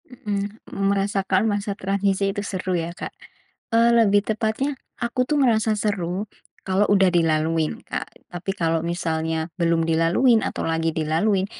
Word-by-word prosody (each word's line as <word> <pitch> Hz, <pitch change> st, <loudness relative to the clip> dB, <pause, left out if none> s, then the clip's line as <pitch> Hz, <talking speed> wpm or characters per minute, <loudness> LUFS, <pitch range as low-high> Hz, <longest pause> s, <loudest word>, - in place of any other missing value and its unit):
Mhm, 210 Hz, -3 st, -5 dB
merasakan 195 Hz, 0 st, +1 dB
masa 205 Hz, -1 st, -1 dB
transisi 195 Hz, 0 st, 0 dB
itu 205 Hz, -, -3 dB
seru, 185 Hz, -2 st, -3 dB
ya, 170 Hz, -1 st, -1 dB
Kak, -, -, -7 dB, 0.6 s
eee, 230 Hz, +1 st, +5 dB
lebih 205 Hz, -3 st, +4 dB
tepatnya 220 Hz, +6 st, -1 dB, 0.2 s
aku 245 Hz, +1 st, -1 dB
tuh 300 Hz, -, +2 dB
ngerasa 220 Hz, -5 st, +2 dB
seru 195 Hz, -2 st, -1 dB, 0.4 s
kalau 190 Hz, +2 st, +2 dB
udah 195 Hz, -2 st, +5 dB
dilaluin, 160 Hz, -1 st, +1 dB
Kak. -, -, -6 dB
Tapi 175 Hz, +2 st, -4 dB
kalau 165 Hz, -1 st, +1 dB
misalnya 160 Hz, -2 st, -2 dB
belum 165 Hz, -1 st, +2 dB
dilaluin 165 Hz, +9 st, +3 dB
atau -, -, -3 dB
lagi 165 Hz, 0 st, 0 dB
dilalui, 165 Hz, +6 st, +1 dB
195 Hz, 140 wpm, -23 LUFS, 165-215 Hz, 0.6 s, eee